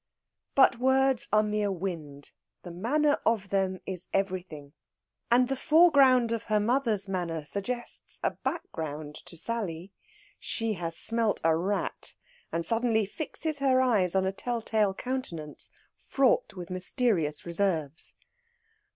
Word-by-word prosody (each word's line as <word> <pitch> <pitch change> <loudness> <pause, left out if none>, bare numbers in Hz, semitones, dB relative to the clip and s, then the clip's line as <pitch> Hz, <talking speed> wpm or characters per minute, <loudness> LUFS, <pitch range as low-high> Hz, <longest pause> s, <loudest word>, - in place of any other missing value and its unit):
But 265 -3 +5
words 265 0 +2
are 215 0 +4
mere 210 -1 0
wind; 160 -7 -6 0.3
the 175 - -8
manner 290 - +1
of 210 -4 +1
them 190 -1 0
is 185 -2 -6
everything, 180 -7 -3 0.6
and 245 +1 +4
the 270 - -1
foreground 275 -6 +5
of 230 -1 -2
her 215 -1 +2
mother's 225 -3 +1
manner 170 -5 -3
suggests 240 +8 -5
a - - +2
background 150 -2 -5
to 170 - -6
Sally. 190 -4 -4 0.5
She 225 -2 -2
has 165 -3 -3
smelt 230 -2 +1
a 165 0 +4
rat, 195 +5 -2 0.4
and 165 0 -2
suddenly 225 +1 +1
fixes 310 - -3
her 265 -2 +3
eyes 210 -9 +2
on 190 0 +2
a 190 - +1
tell 235 +3 -3
tale 210 -4 +1
countenance 175 - -5 0.3
fraught 265 -6 +1
with 180 -1 -8
mysterious 185 - 0
reserves. 170 -4 -2
205 Hz, 135 wpm, -28 LUFS, 175-245 Hz, 0.6 s, But